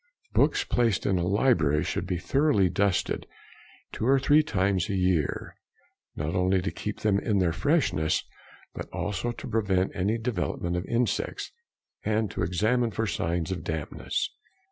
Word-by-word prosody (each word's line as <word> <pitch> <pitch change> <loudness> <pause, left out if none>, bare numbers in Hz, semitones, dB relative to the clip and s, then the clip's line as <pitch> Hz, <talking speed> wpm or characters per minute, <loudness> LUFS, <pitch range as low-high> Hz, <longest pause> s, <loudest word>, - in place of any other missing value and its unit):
Books - - +3
placed 115 -5 +1
in 95 -2 +2
a 85 - 0
library 90 - +3
should 90 - -2
be 90 -1 -1
thoroughly 100 - +2
dusted 95 +1 0 0.6
two 110 - -2
or 135 +1 +5
three 145 +3 +5
times 100 - 0
a 100 - 0
year, 90 -6 0 0.6
not 75 +3 -3
only 95 0 +2
to 95 +2 -2
keep 105 - -5
them 100 -2 +2
in 110 - -1
all - - +3
their 85 -3 +2
freshness, 140 - +1 0.5
but - - -7
also 105 +4 -2
to - - -8
prevent 100 -5 +1
any 100 +5 +1
development 110 -6 -2
of 90 +1 -2
insects 120 0 -1 0.5
and 110 -1 0
to - - -4
examine 110 +8 +1
for 115 +1 -2
signs 85 -2 -1
of 95 - -4
dampness. 80 -3 -2
95 Hz, 160 wpm, -27 LUFS, 90-115 Hz, 0.6 s, or